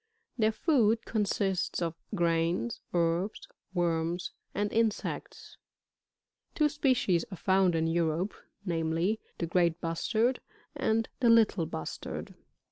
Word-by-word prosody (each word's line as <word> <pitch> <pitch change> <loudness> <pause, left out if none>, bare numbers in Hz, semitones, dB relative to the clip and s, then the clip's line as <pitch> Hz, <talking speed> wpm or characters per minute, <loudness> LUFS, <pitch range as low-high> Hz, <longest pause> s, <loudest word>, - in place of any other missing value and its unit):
Their 220 -3 +3
food 225 -5 +2
consists 200 -3 0
of 165 -2 -1 0.2
grains, 165 - 0
herbs, 175 +4 0 0.2
worms 175 -1 0 0.2
and 205 0 -1
insects. 225 -2 -2 1.0
Two 300 -1 +3
species 255 - +2
are 190 - -6
found 190 0 +3
in 160 0 +1
Europe, 165 +3 0 0.3
namely; 165 +4 0 0.2
the 170 - -1
great 170 0 +2
Bustard, 220 +10 0 0.4
and 225 +1 +1
the 245 -3 +4
Little 215 -7 +4
Bustard. 80 - -6
180 Hz, 110 wpm, -30 LUFS, 165-220 Hz, 1.0 s, the